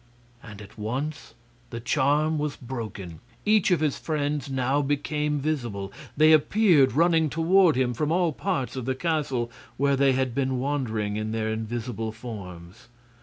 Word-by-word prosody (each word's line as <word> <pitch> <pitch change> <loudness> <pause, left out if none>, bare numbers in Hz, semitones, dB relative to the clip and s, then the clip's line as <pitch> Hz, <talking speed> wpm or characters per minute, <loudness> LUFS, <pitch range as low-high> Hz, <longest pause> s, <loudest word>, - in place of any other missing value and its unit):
And 105 -2 -10
at 105 +2 -15
once 130 +5 -4 0.3
the 115 - -6
charm 150 +5 +1
was 150 -1 -2
broken; 110 - -7 0.3
each 215 -2 +4
of 175 -4 +2
his 150 -3 0
friends 145 -2 -2
now 135 +2 +1
became 150 +1 -1
visible. 120 -10 -3 0.2
They 155 +1 +6
appeared 155 - +4
running 165 +1 +3
toward 165 +2 +4
him 125 -1 +1
from 150 +5 -1
all 175 -1 +2
parts 135 - -2
of 130 -3 -4
the 130 0 -1
castle, 140 -6 -1 0.3
where 140 +1 +2
they 135 0 +3
had 130 -2 0
been 130 0 0
wandering 115 -7 -2
in 110 +1 -3
their 110 -1 -1
invisible 110 0 -4
forms. 100 -6 -10
135 Hz, 155 wpm, -26 LUFS, 115-150 Hz, 0.3 s, They